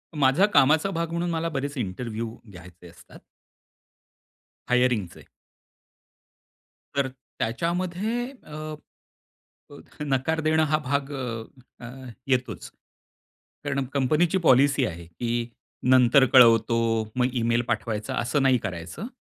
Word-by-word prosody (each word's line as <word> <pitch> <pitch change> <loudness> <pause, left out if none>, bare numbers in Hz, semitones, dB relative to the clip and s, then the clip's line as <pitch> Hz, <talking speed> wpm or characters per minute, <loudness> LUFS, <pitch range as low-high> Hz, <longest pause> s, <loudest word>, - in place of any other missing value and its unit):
माझ्या 140 +6 +4
कामाचा 155 +7 +4
भाग 165 -1 -3
म्हणून 170 +1 -2
मला 165 0 -1
बरेच 140 -1 -4
इंटरव्ह्यू 115 +1 -4 0.2
घ्यायचे 90 -1 -13
असतात. 85 - -16 1.5
हायरिंगचे. 125 -7 0 1.7
तर 140 -1 +1 0.3
त्याच्यामध्ये 180 - -1
अ, 155 - -8 1.3
नकार 140 +4 0
देणं 155 0 +2
हा 155 - +3
भाग 140 +1 -1
अ, 120 -4 -4 0.4
अ, - - -6 0.4
येतोच. 125 -4 -2 0.9
कारण 140 -1 -1
कंपनीची 155 +7 +2
पॉलिसी 140 +2 +4
आहे 85 -1 -7
की 120 +7 -3 0.4
"नंतर 130 +1 +6
कळवतो," 115 -2 +6 0.4
मग 125 0 +2
इमेल 115 +1 +1
पाठवायचा 110 +2 -2
असं 130 +4 0
नाही 130 -2 +4
करायचं. 90 - -6
130 Hz, 105 wpm, -25 LUFS, 115-155 Hz, 1.7 s, नंतर